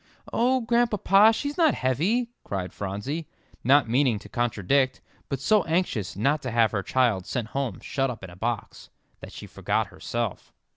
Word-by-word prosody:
"Oh, 255 +2 +2
Grandpapa, 225 -3 +4
she's 285 +7 -3
not 320 -4 +4
heavy," 190 - 0
cried 95 -2 -4
Phronsie, 105 - -4 0.4
not 135 +1 +5
meaning 125 -1 +2
to - - -12
contradict, 120 +3 +1 0.3
but 135 - -2
so 210 +8 +3
anxious 165 - -1
not 140 +9 +1
to 130 - -4
have 115 -2 +3
her 100 - -1
child 110 -3 +1
sent 115 -3 -3
home 135 -8 -3
shut 135 -1 -1
up 115 -6 -7
in 95 - -8
a - - -12
box, 115 +3 -4 0.3
that - - -10
she - - -9
forgot - - -1
herself. - - -4
130 Hz, 165 wpm, -26 LUFS, -, 0.4 s, not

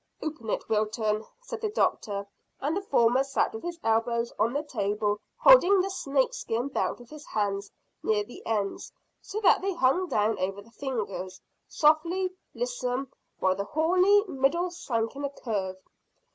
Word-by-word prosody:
"Open 295 -8 -5
it, - - -2
Wilton," 215 0 0 0.2
said 480 -3 -6
the 435 - 0
doctor, 200 - 0 0.3
and 295 +4 -1
the 400 - -1
former 255 -7 +3
sat 275 0 0
with 220 - -6
his 345 -1 -5
elbows 235 +1 +1
on 230 - +3
the 290 +3 -1
table 210 -5 -1 0.2
holding 400 -6 +7
the 385 +1 0
snakeskin 270 -6 -1
belt - - -1
with 240 +2 -15
his 305 -1 -10
hands 200 -1 -1 0.3
near 210 -1 +1
the 240 - -12
ends, 205 -3 -2 0.3
so 420 - -5
that 395 - +5
they 390 -1 -1
hung 340 +5 +2
down 215 +1 +1
over 195 +2 -2
the 215 +3 -14
fingers, 215 -9 -4 0.3
softly 340 +5 +2 0.2
lissome, 275 - -2 0.3
while 185 0 +2
the 200 - -2
horny 365 - +4
middle 340 +4 +1
sank 230 -9 -2
in 285 - -6
a 280 - 0
curve. 200 -8 -3
255 Hz, 160 wpm, -28 LUFS, 215-340 Hz, 0.3 s, holding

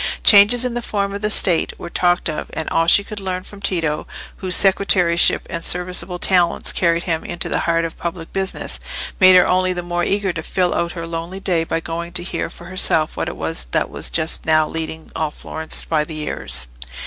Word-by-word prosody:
Changes 215 +4 +6
in 250 - -2
the 240 - -3
form 200 -3 -2
of 200 - -5
the 210 - -1
State 180 -5 +2
were - - -8
talked 175 0 +1
of, 155 -2 -5
and 160 - -4
all 165 0 +1
she 200 - +5
could 210 +1 -7
learn 185 -1 -4
from 200 +1 -14
Tito, 165 -6 -2 0.3
whose 185 -2 0
secretaryship 185 -3 +3
and 165 -1 -5
serviceable 180 0 0
talents 175 -2 +1
carried 170 -1 +1
him 165 -3 -2
into 175 - -4
the - - -1
heart 165 0 +1
of 165 - -8
public 170 -1 -6
business, 190 -1 -3 0.4
made 185 -1 +7
her 180 - +6
only 185 0 +1
the 175 -1 -5
more 175 0 -2
eager 195 -1 0
to 165 - -5
fill 180 +2 -1
out 170 0 -2
her 165 -1 -6
lonely 165 +3 -6
day 180 -4 0
by 165 0 -2
going 170 +1 -6
to 175 - -3
hear 180 - -4
for 175 - -14
herself 175 -3 +2
what - - -3
it - - -9
was - - 0
that - - -2
was - - -2
just 160 0 -1
now 155 -1 +2
leading 160 0 -4
all 155 -1 -1
Florence 160 +1 -2
by 155 -2 0
the 155 +1 -7
ears. 65 - +3
175 Hz, 215 wpm, -19 LUFS, 165-185 Hz, 0.4 s, made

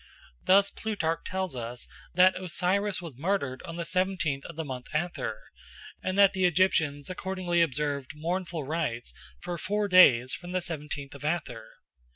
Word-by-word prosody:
Thus 200 +1 +5
Plutarch 175 -7 -2
tells 185 -5 -2
us 120 0 -5 0.3
that 185 +1 +6
Osiris 185 +3 0
was 145 -7 -9
murdered 145 -7 -1
on 165 - -6
the 170 0 -3
seventeenth 180 -6 0
of 170 - -8
the 160 0 -4
month 130 -3 -6
Athyr, 155 -8 -1 0.7
and 185 +1 -2
that 200 -1 +6
the 190 -2 +1
Egyptians 160 -5 +2
accordingly 185 -2 -1
observed 145 -3 -1
mournful 170 0 -3
rites 135 - -3 0.3
for 175 -1 -4
four 205 +3 0
days 130 -10 +6
from 175 +1 -6
the 185 - +1
seventeenth 150 -4 -5
of 140 - -11
Athyr. 140 -8 -2
170 Hz, 155 wpm, -28 LUFS, 140-185 Hz, 0.7 s, that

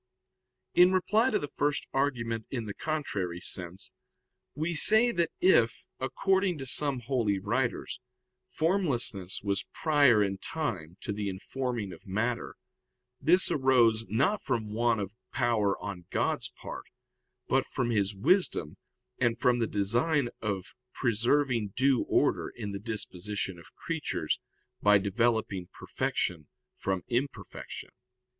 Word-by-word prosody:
In 180 +1 +6
reply 215 +6 +3
to 215 - +2
the 145 - -4
first 145 0 -1
argument 115 -5 -1
in 120 -4 -3
the 100 - -5
contrary 100 - -3
sense, 90 +1 -6 0.6
we 160 +4 -1
say 220 +9 +7
that 170 -5 +1
if, 120 -12 +3
according 190 +6 +1
to 135 - -6
some 135 0 0
holy 115 -5 0
writers, 115 +6 -2 0.5
formlessness 125 - 0
was 100 -2 -1
prior 140 -9 +4
in 95 -1 -2
time 95 - -4
to 105 - -3
the 100 -1 -2
informing 115 +1 -4
of 90 +5 -15
matter, 115 +5 -2 0.7
this 180 +4 +4
arose, 120 -5 +3
not 140 - +1
from 110 -5 -2
want 115 0 +2
of 100 0 -4 0.2
power 115 -5 +1
on 90 -3 -7
God's - - 0
part, - - -9 0.6
but - - +3
from 120 -2 -1
His 100 -2 +1
wisdom, 100 - +1 0.4
and 115 -1 +2
from 120 0 +2
the 115 - +1
design 120 +8 +1
of 100 -4 -3 0.2
preserving 120 -2 +1
due 130 -1 +3
order - - +2
in 105 -4 -6
the 100 - -5
disposition 100 -3 -4
of 85 - -17
creatures 150 - -2 0.4
by 105 0 +6
developing 100 -2 0
perfection 75 -5 -2 0.3
from 95 -2 -2
imperfection. 130 +3 -4
115 Hz, 130 wpm, -29 LUFS, 100-140 Hz, 0.7 s, say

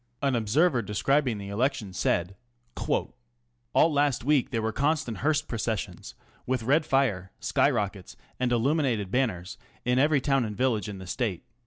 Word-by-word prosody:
An 135 -2 +2
observer 125 +5 +2
describing 120 +4 +1
the 100 -1 -7
election 105 -2 -1
said: 90 +1 0 0.4
ŌĆö - - -5
Ō¢Ā - - 0 0.6
All 160 - +4
last 145 -4 +1
week 140 -1 +2
there 120 -4 -1
were 110 0 -1
constant 140 -3 0
Hearst 155 +1 +1
processions, 110 -5 -4 0.3
with 130 -2 0
red 150 +6 +2
fire, 105 -9 +1
sky - - +2
rockets, - - -3 0.2
and 125 -1 0
illuminated 120 - +1
banners, 105 -8 -1 0.3
in 125 +1 +2
every 145 +1 +4
town 135 -1 +1
and 105 -3 -5
village 110 -6 0
in 100 - -6
the 95 - -9
Stale. 95 -1 -2
125 Hz, 165 wpm, -27 LUFS, 105-140 Hz, 0.6 s, All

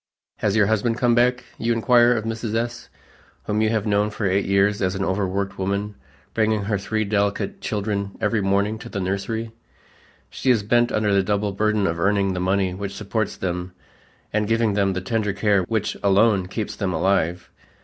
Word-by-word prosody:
"Has 105 -1 0
your 110 -2 +4
husband 110 +2 +1
come 120 -1 +3
back?" 125 +1 +2 0.2
you 115 +1 +1
inquire 120 +1 +4
of 110 -2 -2
Mrs. 115 -1 -3
S., 120 +1 -3 0.5
whom 105 0 -1
you 110 - +2
have 110 -1 0
known 105 0 +2
for 105 0 -4
eight 95 +1 +1
years 100 +1 +2
as 95 0 0
an 95 0 -1
overworked 95 +1 -2
woman 100 +2 -2 0.4
bringing 110 -2 +1
her 100 0 -1
three 110 +2 -1
delicate 100 - -1
children 100 - -3
every 105 0 +1
morning 100 +3 +1
to 120 - -9
the 100 - -4
nursery; 100 +4 -3 0.8
she 130 - -2
is 115 -5 +3
bent 120 +3 +2
under 105 -1 +1
the 100 - +4
double 100 +1 0
burden 105 +1 +1
of 85 -2 -1
earning 100 +1 +2
the 90 - -3
money 95 0 +1
which 100 +1 -5
supports 105 0 -2
them 90 0 -3 0.6
and 105 0 +1
giving 115 -1 +2
them 100 -1 +1
the 95 - -3
tender 105 0 -1
care 100 -1 +2
which 110 +2 -1
alone 100 -1 +3
keeps 105 +2 -4
them 95 -3 -2
alive. 90 0 0
105 Hz, 190 wpm, -23 LUFS, 100-110 Hz, 0.8 s, your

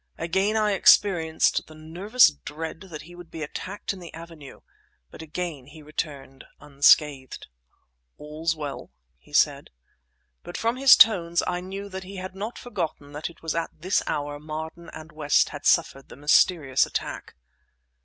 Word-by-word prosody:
Again 190 +6 0
I 210 -1 +2
experienced 175 -4 +3
the 155 - -14
nervous 175 +7 +3
dread 160 +3 -8
that 155 -3 -8
he 175 +3 -14
would 175 -1 -12
be 160 -2 -6
attacked 190 +7 -5
in 195 - -11
the 175 -2 -10
avenue; 165 -4 -12 0.5
but - - -11
again 160 -4 -5
he 150 +1 -14
returned 145 -3 -6 0.2
unscathed. 140 -1 +2 0.7
"All's 155 +2 -3
well," 145 -3 -6 0.3
he 65 - -23
said. - - +2 0.7
But 175 - -8
from 230 +2 -1
his 270 -1 +8
tones 170 -6 +4
I 180 0 -2
knew 195 +2 -7
that 190 -1 -7
he 195 +2 -10
had 185 0 -6
not 210 +5 -6
forgotten 155 -11 -5
that 150 +3 -5
it 170 - -19
was 165 - -2
at 165 0 -2
this 185 +5 +1
hour 145 0 -3
Marden 160 +2 -7
and 160 +1 -11
West 150 -2 +2
had - - -4
suffered 135 0 +1
mysterious 145 -1 +3
attack. - - -5
165 Hz, 155 wpm, -25 LUFS, 150-185 Hz, 0.7 s, his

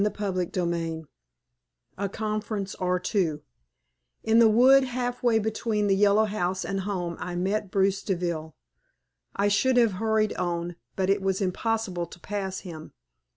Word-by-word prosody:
CHAPTER 195 -4 -1
XVII 170 -2 -2 0.9
A 200 +1 -2
CONFERENCE 215 -1 -3
OR 180 -1 +1
TWO 180 -5 -1 0.8
In 225 +1 +4
the 230 -1 +7
wood 260 +5 +6
half 245 -1 -3
way 235 -2 +3
between 220 0 -1
the 195 -1 +3
Yellow 205 +2 +4
House 190 -3 -2
and 195 0 -2
home 185 -4 -3
I 180 +1 -4
met 195 +3 -1
Bruce 195 +1 +1
Deville. 170 -5 -3 0.8
I 200 - +2
should 250 +5 +2
have 235 -3 +5
hurried 220 -1 +2
on, 175 -1 -2 0.2
but 190 0 +1
it 200 0 +1
was 190 -1 0
impossible 195 -2 -1
to - - -13
pass 190 0 -4
him. 160 -4 -9
195 Hz, 150 wpm, -26 LUFS, 180-215 Hz, 0.9 s, the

